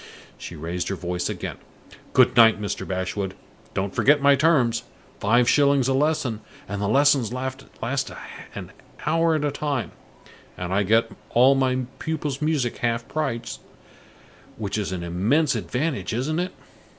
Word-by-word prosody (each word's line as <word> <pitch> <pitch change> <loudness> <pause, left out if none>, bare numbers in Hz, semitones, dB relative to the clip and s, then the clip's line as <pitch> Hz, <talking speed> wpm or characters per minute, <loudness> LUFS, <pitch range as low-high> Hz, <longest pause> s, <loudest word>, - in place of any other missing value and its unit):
She 85 - -9
raised 85 +3 -4
her 100 - -2
voice 90 -1 -3
again. - - -5 0.6
"Goodnight, 120 -4 +6
Mr. 105 -1 -4
Bashwood! 95 +1 -3 0.4
Don't 95 +1 -2
forget 145 +2 +4
my 140 0 +5
terms. 135 -6 +3 0.4
Five 120 +4 +3
shillings 140 -2 +4
a 135 - +2
lesson, 135 -6 0 0.3
and 100 +1 -4
the 100 - 0
lessons 135 -1 +3
last 130 +1 -4 0.9
an - - -7 0.3
hour 165 +1 +2
at 150 -1 0
a 145 - 0
time, 140 - -2 0.7
and 90 +1 -3
I 100 - +3
get 115 +3 +2 0.2
all 130 +3 +7
my 130 -1 +1 0.2
pupils' 150 -3 -3
music 150 -6 0
half 115 -1 -1
price, 120 -7 -3 1.0
which 105 -2 -3
is 105 -3 -2
an 90 -2 -4
immense 110 - +2
advantage, 135 -2 -2
isn't 150 +7 -1
it?" 180 +1 -2
125 Hz, 145 wpm, -24 LUFS, 105-145 Hz, 1.0 s, all